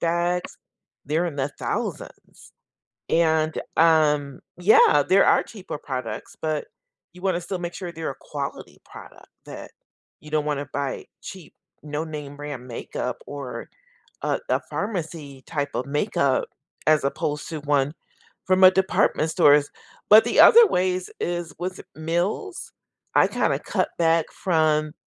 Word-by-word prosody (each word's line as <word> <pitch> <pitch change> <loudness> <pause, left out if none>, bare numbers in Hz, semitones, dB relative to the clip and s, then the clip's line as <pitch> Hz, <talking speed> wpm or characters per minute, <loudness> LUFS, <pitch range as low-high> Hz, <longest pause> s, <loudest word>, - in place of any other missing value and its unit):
bags, 175 +1 -1 0.5
they're 160 +4 0
in 150 -4 -5
the 140 +1 -2
thousands, - - -6 0.6
and, 160 -1 +1 0.2
um, 150 -4 +3 0.2
yeah, 175 -6 +5
there 195 +1 +5
are - - +5
cheaper 195 -8 -8
products, 125 -7 -6
but 155 -2 -2 0.5
you 180 - -14
want 190 -2 +1
to 175 - -2
still 185 +1 -5
make 175 0 -5
sure 175 -2 -6
they're 160 -2 -4
a - - -11
quality 140 -2 -7
product - - -14 0.2
that - - -9 0.5
you 150 - -13
don't 155 -1 +1
want 145 -2 -1
to 145 - -6
buy 140 -2 -3 0.2
cheap, 185 -4 -10 0.3
no 150 +1 -4
name 150 -3 -7
brand 145 -4 -7
makeup 115 - -5
or 125 -5 -7 0.5
a - - 0
a - - +1
pharmacy 160 -9 -5
type 145 -3 -2
of 125 - -2
makeup 140 -2 +1 0.4
as 155 -2 +4
opposed 150 +1 -2
to 160 - -5
one 145 0 +1 0.5
from 185 0 +2
a 185 - +10
department 190 -4 +1
stores, 145 -2 +4 0.4
but 215 +1 +9
the - - -2
other 460 -2 +9
ways 185 0 0
is 175 -3 -3
with 185 +1 -5 0.2
meals, 175 - -2 0.5
I - - +6
kinda - - 0
cut - - -1
back 165 -1 +3
from 155 -3 +1
155 Hz, 145 wpm, -24 LUFS, 145-175 Hz, 0.6 s, a